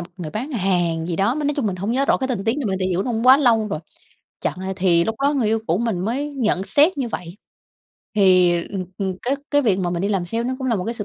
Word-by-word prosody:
một 175 Hz, +1 st, -9 dB
người 170 Hz, -5 st, -6 dB
bán 245 Hz, -, -4 dB
hàng 175 Hz, -6 st, 0 dB
gì 170 Hz, -, -3 dB
đó, 200 Hz, +8 st, +1 dB
m -, -, -4 dB
nói 295 Hz, -1 st, 0 dB
chung 270 Hz, -, 0 dB
mình 190 Hz, -3 st, -2 dB
hổng 195 Hz, +4 st, -3 dB
nhớ 270 Hz, +2 st, +2 dB
rõ -, -, +3 dB
cái 265 Hz, 0 st, -3 dB
tình 215 Hz, -6 st, -2 dB
tiết 225 Hz, +2 st, +1 dB
nhưng 265 Hz, -7 st, -2 dB
mà 190 Hz, -, 0 dB
tại 185 Hz, -, -1 dB
vì 185 Hz, -, -1 dB
lúc 185 Hz, -, 0 dB
đó 255 Hz, -, -2 dB
cũng 225 Hz, +1 st, -2 dB
quá 260 Hz, +1 st, +9 dB
lâu 230 Hz, -6 st, +2 dB
rồi, 155 Hz, -, -3 dB, 0.6 s
chặng -, -, -2 dB
lại 190 Hz, 0 st, -4 dB
thì 175 Hz, -3 st, +3 dB
lúc 225 Hz, -, -2 dB
đó 285 Hz, +1 st, +3 dB
người 255 Hz, -5 st, +1 dB
yêu 225 Hz, -, +2 dB
cũ 170 Hz, +4 st, +1 dB
mình 230 Hz, -6 st, -1 dB
mới 265 Hz, +9 st, -2 dB
nhận 215 Hz, -8 st, 0 dB
xét 295 Hz, -, +3 dB
như 255 Hz, -, -1 dB
vậy. 180 Hz, -4 st, -7 dB, 0.8 s
Thì, 185 Hz, -3 st, +5 dB, 0.2 s
ừm, 190 Hz, -2 st, -4 dB
ừm, 190 Hz, -2 st, -3 dB
cái 265 Hz, +3 st, 0 dB
cái 290 Hz, 0 st, +3 dB
việc 200 Hz, -7 st, +2 dB
mà 180 Hz, -2 st, -1 dB
mình 175 Hz, 0 st, -2 dB
đi 200 Hz, -, 0 dB
làm 195 Hz, -4 st, -1 dB
sale 230 Hz, +6 st, -2 dB
nó 255 Hz, +2 st, -1 dB
cũng 260 Hz, -, -4 dB
là 230 Hz, -, +1 dB
một 180 Hz, -, -3 dB
cái 230 Hz, -, -3 dB
sự 215 Hz, -, -5 dB
210 Hz, 310 wpm, -21 LUFS, 185-250 Hz, 0.8 s, quá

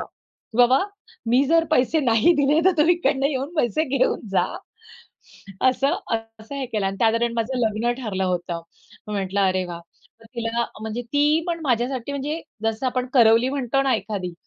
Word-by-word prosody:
की 225 Hz, -, -14 dB
"बाबा, 245 Hz, +2 st, +5 dB, 0.5 s
मी 245 Hz, +4 st, +4 dB
जर 330 Hz, +2 st, +3 dB
पैसे 310 Hz, +2 st, +2 dB
नाही 235 Hz, +4 st, +4 dB
दिले 290 Hz, +2 st, +3 dB
तर 375 Hz, -, +5 dB
तुम्ही 330 Hz, +4 st, +5 dB
इकडनं 275 Hz, -5 st, +1 dB
येऊन 280 Hz, +2 st, -3 dB
पैसे 305 Hz, +3 st, +1 dB
घेऊन -, -, +1 dB
जा." 195 Hz, -, +2 dB, 1.2 s
असं 275 Hz, +6 st, +1 dB, 0.2 s
अ, -, -, +4 dB, 0.2 s
असं 220 Hz, +6 st, -10 dB
हे 275 Hz, -2 st, -3 dB
केलं 210 Hz, -4 st, -2 dB
आणि 195 Hz, 0 st, -3 dB
त्या 225 Hz, -1 st, +5 dB
दरम्यान 235 Hz, 0 st, 0 dB
माझं 235 Hz, +3 st, -2 dB
लग्न 225 Hz, +1 st, 0 dB
ठरलं 190 Hz, -4 st, -2 dB
होतं. 175 Hz, -2 st, -2 dB, 0.5 s
मी 210 Hz, -, -4 dB
म्हटलं, 195 Hz, 0 st, -1 dB
"अरे 185 Hz, 0 st, 0 dB
वाह." 175 Hz, -1 st, -7 dB, 0.4 s
तर 225 Hz, -, -18 dB
तिला 235 Hz, 0 st, -1 dB, 0.2 s
म्हणजे 220 Hz, +2 st, -4 dB
ती 290 Hz, +6 st, +2 dB
पण 335 Hz, -1 st, -2 dB
माझ्यासाठी 250 Hz, +1 st, -1 dB
म्हणजे 290 Hz, +4 st, -3 dB, 0.2 s
जसं 225 Hz, +3 st, -1 dB
आपण 255 Hz, 0 st, -1 dB
करवली 230 Hz, 0 st, +5 dB
म्हणतो 275 Hz, -1 st, 0 dB
ना 270 Hz, -1 st, +2 dB
एखादी, 200 Hz, -4 st, -4 dB
245 Hz, 180 wpm, -23 LUFS, 220-275 Hz, 1.2 s, बाबा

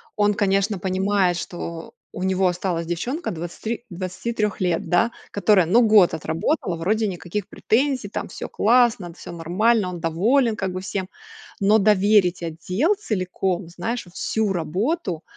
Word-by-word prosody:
он 205 Hz, 0 st, +3 dB
конечно 200 Hz, -1 st, +1 dB
понимает, 190 Hz, -1 st, +1 dB
что 170 Hz, -1 st, -6 dB, 0.2 s
у 185 Hz, -, -5 dB
него 190 Hz, 0 st, +2 dB
осталась 175 Hz, -2 st, -1 dB
девчонка 245 Hz, -, -3 dB
23 180 Hz, +8 st, -5 dB
23 190 Hz, +4 st, -3 dB
лет 175 Hz, -2 st, 0 dB
да, 205 Hz, +7 st, +3 dB, 0.2 s
которая 200 Hz, -2 st, +3 dB
ну 215 Hz, +9 st, +4 dB
год 210 Hz, -5 st, +6 dB
отработала. 165 Hz, -, -1 dB
Вроде 215 Hz, +6 st, 0 dB
никаких 180 Hz, +1 st, -4 dB
претензий, 255 Hz, -1 st, 0 dB
там 200 Hz, -, -5 dB
всё -, -, -6 dB
классно, 230 Hz, -5 st, +3 dB
д 170 Hz, -, -13 dB
всё -, -, -9 dB
нормально, 185 Hz, +5 st, +1 dB
он 175 Hz, -1 st, -6 dB
доволен 220 Hz, -, +2 dB
как 190 Hz, -3 st, -2 dB
бы 185 Hz, -, -4 dB
всем. 190 Hz, -1 st, -4 dB, 0.5 s
Но 205 Hz, +2 st, +4 dB
доверить 205 Hz, -3 st, +3 dB
отдел 180 Hz, -, 0 dB
целиком, 185 Hz, -, -2 dB
знаешь, 190 Hz, +8 st, -4 dB
вот 175 Hz, 0 st, -18 dB
всю 220 Hz, -3 st, 0 dB
работу, 185 Hz, -, -2 dB
190 Hz, 150 wpm, -23 LUFS, 175-215 Hz, 0.5 s, год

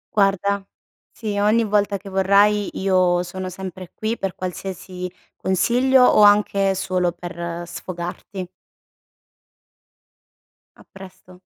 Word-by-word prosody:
Guarda 200 Hz, -1 st, +2 dB, 0.5 s
sì 210 Hz, -3 st, -4 dB
ogni 215 Hz, +3 st, +3 dB
volta 205 Hz, -1 st, +1 dB
che 195 Hz, +1 st, -11 dB
vorrai 200 Hz, +2 st, +3 dB
io 185 Hz, -2 st, +2 dB
sono 185 Hz, +1 st, -6 dB
sempre 185 Hz, -1 st, -8 dB
qui 220 Hz, +2 st, -3 dB
per 195 Hz, -2 st, -3 dB
qualsiasi 185 Hz, 0 st, -6 dB, 0.2 s
consiglio 245 Hz, +8 st, +3 dB
o 210 Hz, -, +5 dB
anche 205 Hz, -1 st, +4 dB
solo 185 Hz, -2 st, 0 dB
per 170 Hz, -1 st, -6 dB
sfogarti. 180 Hz, +2 st, -6 dB, 2.3 s
A -, -, -16 dB
presto. 185 Hz, -1 st, -14 dB
190 Hz, 105 wpm, -21 LUFS, 180-205 Hz, 2.3 s, o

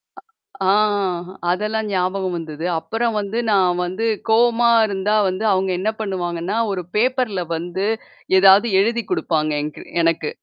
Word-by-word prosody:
அ -, -, -13 dB, 0.5 s
ஆ. -, -, +6 dB, 0.8 s
அதெல்லாம் 215 Hz, +3 st, -2 dB
ஞாபகம் 185 Hz, 0 st, -1 dB
வந்தது. 160 Hz, 0 st, -6 dB
அப்புறம் 225 Hz, +5 st, -2 dB
வந்து 205 Hz, +3 st, -4 dB
நான் 180 Hz, -3 st, +2 dB
வந்து 190 Hz, +6 st, -3 dB, 0.2 s
கோவமா 235 Hz, +1 st, +4 dB, 0.2 s
இருந்தா 200 Hz, +1 st, -1 dB
வந்து 185 Hz, +4 st, -4 dB
அவங்க 190 Hz, 0 st, 0 dB
என்ன 210 Hz, +3 st, 0 dB
பண்ணுவாங்கன்னா, 180 Hz, -1 st, -3 dB, 0.2 s
ஒரு 185 Hz, -2 st, -2 dB
பேப்பர்ல 245 Hz, -4 st, +1 dB
வந்து 175 Hz, +4 st, -3 dB, 0.5 s
ஏதாவது 195 Hz, +4 st, +6 dB
எழுதி் 230 Hz, +2 st, 0 dB
குடுப்பாங்க 160 Hz, -, 0 dB
என்கு 150 Hz, 0 st, -7 dB, 0.2 s
எனக்கு. 165 Hz, -2 st, +1 dB
195 Hz, 130 wpm, -20 LUFS, 180-220 Hz, 0.8 s, ஆ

